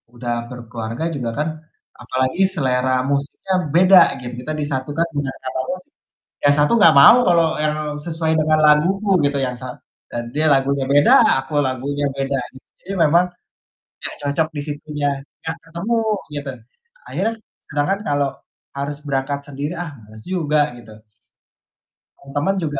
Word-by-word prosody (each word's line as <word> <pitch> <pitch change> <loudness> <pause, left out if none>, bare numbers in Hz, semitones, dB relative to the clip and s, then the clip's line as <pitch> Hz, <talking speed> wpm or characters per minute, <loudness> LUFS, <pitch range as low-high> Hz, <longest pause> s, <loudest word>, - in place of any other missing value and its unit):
udah 120 0 -3 0.2
berkeluarga 115 +1 -6
juga 125 -4 -3
kan, 150 - 0 0.5
apalagi 130 +6 -1
selera 130 -5 0 0.2
musiknya 140 +7 -2 0.2
beda 185 +1 +8 0.2
gitu 120 0 -7
kita 155 +4 -4
disatukan 145 +3 -1
dengan 135 -2 -2
kata 130 0 -4
mus 180 0 -4 0.6
yang 145 - +6
satu 145 - +3
gak 205 - +7
mau 140 - +9
kalau 170 -2 +4 0.2
yang 150 0 +1 0.3
sesuai 160 -1 -1
dengan 155 0 +3
laguku 185 +7 +3 0.2
gitu, 140 - 0
yang 125 - -3
sa 130 - -6 0.4
dan 120 - -3
dia 155 +2 +2
lagunya 135 0 +1
beda 145 +1 +6 0.3
aku 140 - -9
lagunya 140 +3 -2
beda. 135 0 -1 0.4
Jadi 195 - -7
memang 170 +1 +4 0.8
gak - - -4
cocok 145 +2 0
di - - -2
situnya, 145 0 -3 0.4
gak 160 0 -3
ketemu 170 +8 -2 0.4
gitu 145 -1 -4 0.6
akhirnya 225 - -1 0.4
sedangkan 145 +7 +1
kalau 145 -2 +1 0.5
harus 140 +1 -3
berangkat 140 +1 -1
sendiri, 145 +2 -4
ah, 165 - -7
males 110 +1 -14
juga 155 -5 +1 0.2
gitu. 110 -2 -13 1.3
Temen-temen 145 +7 -1
juga 145 -4 -2
145 Hz, 140 wpm, -20 LUFS, 135-160 Hz, 1.3 s, mau